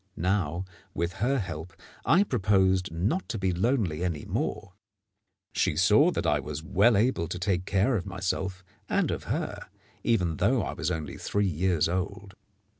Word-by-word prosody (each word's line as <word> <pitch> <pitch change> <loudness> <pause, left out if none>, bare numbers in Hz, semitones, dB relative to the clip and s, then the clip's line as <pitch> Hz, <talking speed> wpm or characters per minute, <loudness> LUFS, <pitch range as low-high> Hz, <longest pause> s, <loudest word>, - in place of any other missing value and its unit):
Now, 90 -1 0 0.3
with 85 +2 -1
her 135 +4 +2
help, 85 -5 -5 0.3
I 185 +5 +5
proposed 95 - +2
not 100 - -1
to - - -2
be 95 -2 0
lonely 95 - 0
any 85 -5 -2
more. 95 - -3 0.8
She - - +1
saw - - +5
that - - -2
I 75 0 +3
was 75 +2 -5
well 100 +5 +4
able 105 -6 +1
to 90 - -4
take 90 -1 0
care 100 +7 +2
of 100 -2 -2
myself 95 0 -3 0.3
and - - +1
of - - -4
her, - - -3 0.4
even 90 -9 +1
though 125 0 +2
I - - -3
was 85 -1 -2
only 80 -4 -4
three 100 0 0
years 90 -2 +1
old. 95 +3 -3
95 Hz, 165 wpm, -28 LUFS, 85-105 Hz, 0.8 s, I